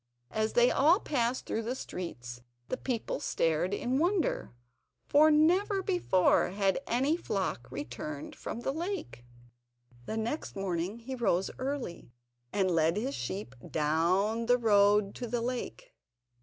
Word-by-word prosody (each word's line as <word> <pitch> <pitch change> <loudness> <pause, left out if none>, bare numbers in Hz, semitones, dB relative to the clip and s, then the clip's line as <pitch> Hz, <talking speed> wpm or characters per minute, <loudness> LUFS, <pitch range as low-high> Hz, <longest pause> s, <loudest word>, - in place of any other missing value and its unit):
As 220 0 0
they 240 +1 +5
all 320 +8 +5
passed 255 - -1
through 225 - -2
the 235 +3 -3
streets 125 - -7 0.3
the - - 0
people 245 -4 -3
stared 165 +3 0
in 250 +6 0
wonder, 350 +2 0 0.5
for 305 +2 +5
never 365 +6 +3
before 355 - +3
had 195 0 +1
any 270 +6 +2
flock 195 - -3
returned 145 +2 -6
from 235 - -6
the 270 - -1
lake. 340 - -4 0.8
The 220 - -3
next 230 +8 -3
morning 190 +1 -2
he 260 +3 -6
rose 195 -7 +1
early, 260 - -4 0.4
and 190 -2 +1
led 165 +2 +2
his 260 +6 -2
sheep 190 - -5 0.2
down 180 +9 +1
the 245 0 +5
road 205 -3 +4
to 245 - -4
the 240 +1 -1
lake. 255 - -4
225 Hz, 140 wpm, -30 LUFS, 185-270 Hz, 0.8 s, they